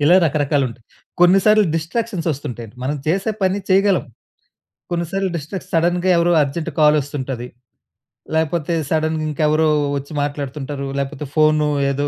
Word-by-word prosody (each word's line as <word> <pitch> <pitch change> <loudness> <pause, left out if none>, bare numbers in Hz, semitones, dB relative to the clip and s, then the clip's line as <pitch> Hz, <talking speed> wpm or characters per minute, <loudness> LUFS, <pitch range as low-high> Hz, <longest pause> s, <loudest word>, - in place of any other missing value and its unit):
ఇలా 165 +5 +6
రకరకాలు 145 -1 +1
ఉంటాయి. 115 -1 -13 0.4
కొన్ని 175 +2 +6
సార్లు 215 0 +6
డిస్‌స్ట్రా‌క్షన్స్ 175 +2 -2
ఒస్తుంటాయి 125 -5 -6 0.2
మనం 145 +3 -1
చేసే 190 +7 +1
పని 190 +1 +2
చేయగలం. 195 0 +3 0.9
కొన్ని 170 -1 -1
సార్లు 195 -1 0
డిస్టక్స్ 165 +4 -6
సడెన్‌గా 175 +2 +2
ఎవరో 170 +1 +3
అర్జెంట్ 155 +4 -3
కాల్ 150 0 +6
ఒస్తుంటది 130 -3 -5 0.9
లేపోతే 160 +1 0 0.2
సడెన్‌ 160 0 +1
ఇంకెవరో 155 +1 +2 0.3
ఒచ్చి 140 +2 -8
మాట్లాడుతుంటారు, 140 -1 -4
లేకపోతే 140 +1 -4
ఫోను 155 -1 +3 0.2
ఏదో, 145 +1 -1
155 Hz, 135 wpm, -19 LUFS, 145-175 Hz, 0.9 s, ఇలా